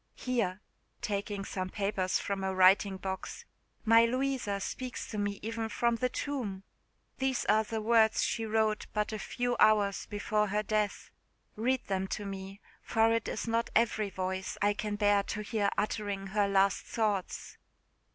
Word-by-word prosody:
Here," 215 -7 -1 0.4
taking 200 -2 -2
some 185 -1 -3
papers 195 -2 0
from 195 -1 -3
a 190 0 -1
writing 190 +1 +5
box, 190 0 -5 0.4
"my 230 +1 +7
Louisa 255 -4 -1
speaks 250 +7 -5
to 210 - -3
me 205 0 -1
even 225 0 -3
from 235 +1 +1
the 250 +2 0
tomb! 235 -9 -3 0.6
These 265 -1 0
are 220 +1 +4
the 220 0 -4
words 225 -1 +4
she 230 - -1
wrote 220 -1 +1
but 210 0 -1
a 215 - -3
few 245 +4 -1
hours 205 -2 +4
before 210 0 0
her 210 +2 0
death. 210 -1 -1 0.4
Read 255 +4 0
them 190 -1 -1
to 205 - -6
me; 195 0 -7 0.2
for 225 0 +3
it 230 -1 0
is 220 - -3
not 230 +1 0
every 220 -2 +2
voice 190 0 -3
I 205 +1 +3
can 210 0 -3
bear 205 -1 +3
to 210 +1 -4
hear 210 -1 0
uttering 205 -2 -2
her 205 0 +2
last 195 0 +3
thoughts." 210 -5 -2
210 Hz, 160 wpm, -31 LUFS, 195-225 Hz, 0.6 s, my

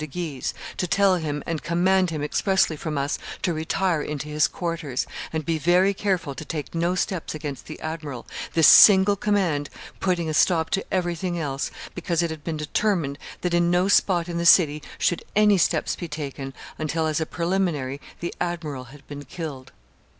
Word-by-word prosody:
de 155 - -4
Guise, 155 -4 -4 0.2
to 180 - -1
tell 190 +2 +3
him 150 -3 -3
and 165 -3 -3
command 185 +2 +2
him 155 -3 -3
expressly 190 +2 +1
from 150 0 -4
us 140 +1 -1 0.2
to 175 - +1
retire 160 +1 0
into 150 0 -4
his 150 0 +3
quarters, 165 -7 -3 0.3
and 160 -2 -3
be 165 0 0
very 180 +5 +3
careful 185 -7 -1
to 135 - -7
take 150 -1 -5
no 170 +2 0
steps 180 -3 -2
against 145 -3 -6
the 155 - -8
admiral, 155 -6 -5 0.3
this 160 -2 +5
single 200 +2 +8
command 185 -8 0 0.3
putting 180 -3 0
a 155 - -2
stop 160 +1 +2
to 195 - +1
everything 175 -1 -1
else, 140 -4 -2 0.2
because 170 -1 -1
it 170 - -1
had 155 -2 -7
been 160 -2 -3
determined 150 -1 -1 0.2
that 180 -1 -1
in 175 0 +3
no 180 +2 +3
spot 180 -4 +3
in 170 -1 -3
the - - -1
city 155 -3 +5 0.2
should 175 - 0
any 210 -1 +5
steps - - +1
be 175 - -6
taken 140 -3 -5 0.3
until, 160 +1 -1
as 155 0 0
a - - 0
preliminary, 170 -7 -1 0.2
the 170 - -3
admiral 160 -7 -3
had 135 +3 -15
been 145 0 -7
killed. 140 -3 -7
165 Hz, 185 wpm, -24 LUFS, 150-180 Hz, 0.3 s, single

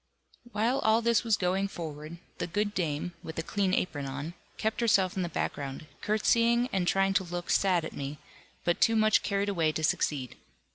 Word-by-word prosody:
While 230 +5 +1
all 220 +1 +3
this 235 0 +3
was 225 -3 +2
going 190 +1 +1
forward, 155 -3 -7 0.2
the - - -1
good 205 +4 -1
dame, 165 -1 -2
with 160 - -8
a 165 - -1
clean 195 +1 0
apron 145 -6 -2
on, 145 +5 -5 0.2
kept 220 +2 -1
herself 195 -5 +3
in 190 - -1
the 175 - -2
background, 140 -2 -3 0.2
curtseying 235 +3 +2
and 185 -2 +1
trying 195 +1 +3
to 195 -1 +2
look 175 0 -4
sad 180 -4 +3
at - - -7
me, 140 +1 -5 0.5
but 175 - 0
too 225 - +5
much 215 0 +4
carried 200 0 0
away 165 -5 +1
to 160 - -3
succeed. 140 -5 0
185 Hz, 190 wpm, -29 LUFS, 160-215 Hz, 0.5 s, too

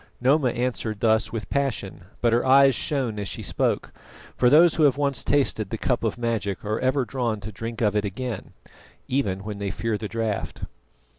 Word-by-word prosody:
Noma 130 +1 +3
answered 120 -3 -2
thus 110 0 +2
with 115 -2 -5
passion, 125 -11 -2 0.2
but 115 -1 +3
her 120 - +3
eyes 135 +1 +6
shone 125 -4 -1
as 100 - -3
she 75 - -6
spoke: - - -1 0.4
for 125 - +4
those 160 +4 +6
who 165 - -1
have 140 -2 +3
once 140 -2 0
tasted 130 -8 +1
the 115 - -3
cup 120 +1 -1
of 115 -1 -1
magic 115 -5 -2
are 110 +2 -1
ever 130 0 +1
drawn 120 -3 -2
to 105 - -6
drink 115 +2 -6
of 105 -2 +2
it 105 - +2
again, 110 +2 -5 0.5
even 100 -8 -1
when 105 -1 -6
they 100 -1 -2
fear 110 +2 -2
the 110 - -4
draught. 110 -1 -3
115 Hz, 195 wpm, -24 LUFS, 105-130 Hz, 0.5 s, eyes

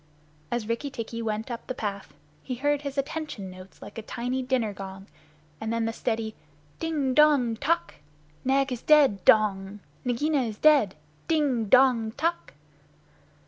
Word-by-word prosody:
As 240 -3 -2
Rikki 230 +5 -2
tikki 230 -3 -5
went 220 +2 -3
up 235 - -6
the 255 - -3
path, 200 -4 -4 0.3
he 255 - -4
heard 290 +3 0
his 280 -1 -6
"attention" 275 -9 -4
notes 185 0 -13
like - - -8
a - - -5
tiny 250 +4 -3
dinner 250 -5 0
gong, 195 0 -8 0.5
and 220 0 -3
then 230 0 0
the 225 - -2
steady 225 -2 -2 0.5
"Ding 300 -5 -1
dong 285 -6 +4
tock! 310 +9 0 0.5
Nag 270 +1 +2
is 245 -2 -3
dead 280 -11 +4
dong! 205 -2 +3 0.2
Nagaina 275 +4 +1
is 220 -4 -3
dead! 285 -10 +4 0.3
Ding 285 -8 +1
dong 235 -1 +4
tock!" 335 +6 -2
240 Hz, 150 wpm, -27 LUFS, 220-280 Hz, 0.5 s, dong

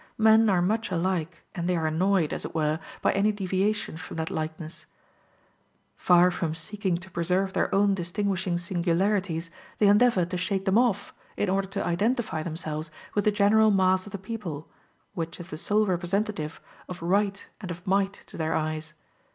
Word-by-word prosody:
Men 220 0 +6
are 180 -3 +3
much 220 +5 0
alike, 175 -2 -2
and 175 -1 -2
they 180 - +2
are 160 - -1
annoyed, 170 +1 +2
as - - -4
it - - -7
were, 155 0 +1 0.2
by - - +4
any 205 +2 +2
deviation 195 -2 -1
from 165 - -8
that 160 0 -2
likeness: 155 +1 -5 1.1
far 180 0 +5
from 165 -2 -2
seeking 185 +2 -2
to 185 +2 -12
preserve 185 +3 0
their - - 0
own 200 0 +4
distinguishing 185 0 -1
singularities, 175 -1 0 0.3
they 210 - +3
endeavor 205 -2 +5
to 180 +1 -4
shake 190 +1 -1
them 195 +3 +4
off, 235 -5 +1 0.2
in 205 - 0
order 195 +1 +1
to 200 +1 -3
identify 215 +1 0
themselves 155 -1 -4 0.2
with 205 - 0
the 210 - +5
general 215 +1 +4
mass 185 -1 +3
of - - -9
the 200 - -4
people, 190 -7 -6 0.5
which 165 -3 -5
is 175 +1 -9
the - - -5
sole 210 +4 +2
representative 180 -2 -1 0.3
of 180 -2 -7
right 200 +3 +1 0.2
and 185 - -6
of 175 0 -7
might 195 +1 0
to - - -12
their 160 -1 0
eyes. 155 0 -3
185 Hz, 175 wpm, -27 LUFS, 170-200 Hz, 1.1 s, Men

